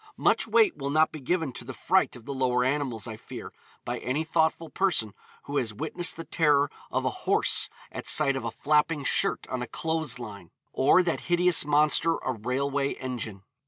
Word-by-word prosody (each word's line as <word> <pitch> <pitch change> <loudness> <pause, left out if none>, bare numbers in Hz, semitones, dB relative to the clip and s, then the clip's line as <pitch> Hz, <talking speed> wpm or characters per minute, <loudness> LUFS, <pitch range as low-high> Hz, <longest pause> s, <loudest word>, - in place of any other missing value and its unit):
Much - - +2
weight 435 -6 +3
will 140 - -4
not 155 +2 +3
be 155 - -8
given 160 0 -1
to - - -5
the 130 +1 -8
fright 190 0 +1
of 120 -2 -13
the 140 - -5
lower 125 -2 +1
animals, 130 -4 -1
I 110 -2 -7
fear, - - -10 0.3
by - - -3
any 140 +5 -2
thoughtful 160 0 0
person 155 - +1 0.3
who 145 0 -4
has 110 -5 -2
witnessed 160 - 0
the 165 - -5
terror 145 -4 +2 0.2
of - - -2
a - - +2 0.2
horse - - +3 0.2
at - - -5
sight 140 -3 +5
of 135 - -4
a 115 - -2
flapping 150 +4 +1
shirt - - +1
on 130 -1 -3
a 125 - -4
clothes 160 -3 -2
line, 100 -8 -9 0.2
or 145 +7 +4
that 170 -2 -1
hideous 175 -2 +4
monster 150 +3 +3
a - - -3
railway 135 +5 -1
engine. 115 -6 -6
140 Hz, 195 wpm, -27 LUFS, 125-160 Hz, 0.3 s, sight